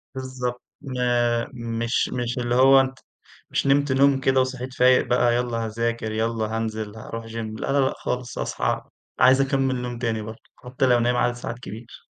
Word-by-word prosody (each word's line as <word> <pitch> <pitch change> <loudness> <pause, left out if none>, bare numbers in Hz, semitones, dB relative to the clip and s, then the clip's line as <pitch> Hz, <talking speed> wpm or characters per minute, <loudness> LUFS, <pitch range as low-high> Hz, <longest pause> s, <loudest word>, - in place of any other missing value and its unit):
بالضبط، 130 -2 -4 0.2
ما 120 -3 0
مش 115 0 -1
مش 120 0 -2
اللي 120 0 0
هو 135 +1 +7
أنت، 130 0 -4 0.5
مش - - -1
نمت 140 0 +3
نوم 135 +1 +4
كده 135 0 +3
وصحيت 130 0 -4
فايق 125 0 +4
بقى 120 -1 +3
يلّا 120 -2 -1
هاذاكر 115 0 -2
يلّا 110 0 -1
هانزل 110 -1 -4
هاروح 115 +1 -7
جيم؛ 115 0 -10 0.3
لأ - - -2
لأ 140 - +2
لأ 135 -1 +2
خالص، 125 -1 -4
أصحى - - -1 0.4
عايز 130 +1 +6
أكمل 135 -1 +1
نوم 125 -1 -4
تاني 115 -2 -1
برضو 110 +1 -9 0.2
حتّى 125 +1 -2
لو 125 -2 +4
نايم 120 +1 +1
عدد 120 0 +2
ساعات 120 0 -6
كبير. 115 +2 -10
125 Hz, 175 wpm, -24 LUFS, 115-130 Hz, 0.5 s, هو